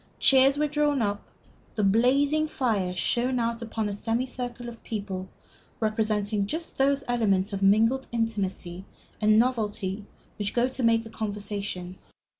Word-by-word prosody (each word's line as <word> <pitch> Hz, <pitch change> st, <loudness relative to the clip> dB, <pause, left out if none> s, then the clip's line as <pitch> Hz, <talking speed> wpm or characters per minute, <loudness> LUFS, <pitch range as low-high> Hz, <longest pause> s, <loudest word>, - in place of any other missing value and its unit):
Chairs 270 Hz, +1 st, +5 dB
were 300 Hz, -, +2 dB
drawn 295 Hz, -1 st, +1 dB
up. 205 Hz, 0 st, -1 dB, 0.5 s
The 215 Hz, -, 0 dB
blazing 275 Hz, +9 st, +3 dB
fire 210 Hz, -11 st, -1 dB
shone 250 Hz, +6 st, +1 dB
out 235 Hz, 0 st, -1 dB
upon 225 Hz, -2 st, -3 dB
a 205 Hz, -, -3 dB
semicircle 245 Hz, +2 st, -3 dB
of 235 Hz, -1 st, -10 dB
people 195 Hz, -4 st, -5 dB, 0.5 s
representing 215 Hz, -2 st, 0 dB
just 325 Hz, +7 st, -4 dB
those 275 Hz, +1 st, +2 dB
elements 205 Hz, -5 st, +1 dB
of 195 Hz, -, -3 dB
mingled 225 Hz, +7 st, +3 dB
intimacy 195 Hz, -6 st, -2 dB, 0.4 s
and 215 Hz, 0 st, +5 dB
novelty 210 Hz, -5 st, 0 dB, 0.4 s
which 205 Hz, -1 st, -2 dB
go 240 Hz, +1 st, +3 dB
to 260 Hz, 0 st, -5 dB
make 230 Hz, -1 st, +2 dB
conversation. 200 Hz, -4 st, -4 dB
225 Hz, 135 wpm, -27 LUFS, 205-250 Hz, 0.5 s, Chairs